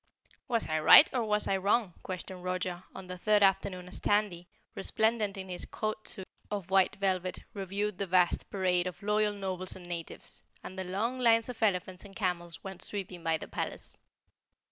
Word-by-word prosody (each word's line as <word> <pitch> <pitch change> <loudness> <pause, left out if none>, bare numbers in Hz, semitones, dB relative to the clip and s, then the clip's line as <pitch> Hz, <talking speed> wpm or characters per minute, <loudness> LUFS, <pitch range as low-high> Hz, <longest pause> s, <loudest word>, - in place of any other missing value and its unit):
"Was 235 -2 0
I 155 0 0
right 155 - +10
or 245 -3 +1
was 210 -1 +1
I 195 - +2
wrong?" 200 0 +1
questioned 185 0 -6
Roger 185 0 -2
on 190 - -7
the 180 0 -7
third 210 +1 +4
afternoon 185 -2 +2
as 180 - -9
Tandy, 205 -4 +1 0.3
resplendent 220 0 0
in 190 0 -6
his 180 -1 -3
court 215 0 -4
suit 190 - -6 0.2
of 200 -3 -4
white 190 -1 +4
velvet, 185 -2 0 0.2
reviewed 200 0 -3
the 200 - -1
vast 180 -1 +2
parade 180 -2 +1
of 185 +2 -7
Loyal 210 0 +2
Nobles 185 -2 -4
and 180 - -11
Natives, 170 -2 -6 0.2
and 185 - -8
the 190 - -3
long 220 +8 -1
lines 230 -1 +4
of 245 -2 -7
elephants 185 -3 0
and 200 -1 -13
camels 175 -5 -2
went 190 -2 -7
sweeping 185 -4 -4
by 165 -1 +2
the - - -8
palace. - - -4
190 Hz, 185 wpm, -31 LUFS, 180-210 Hz, 0.3 s, right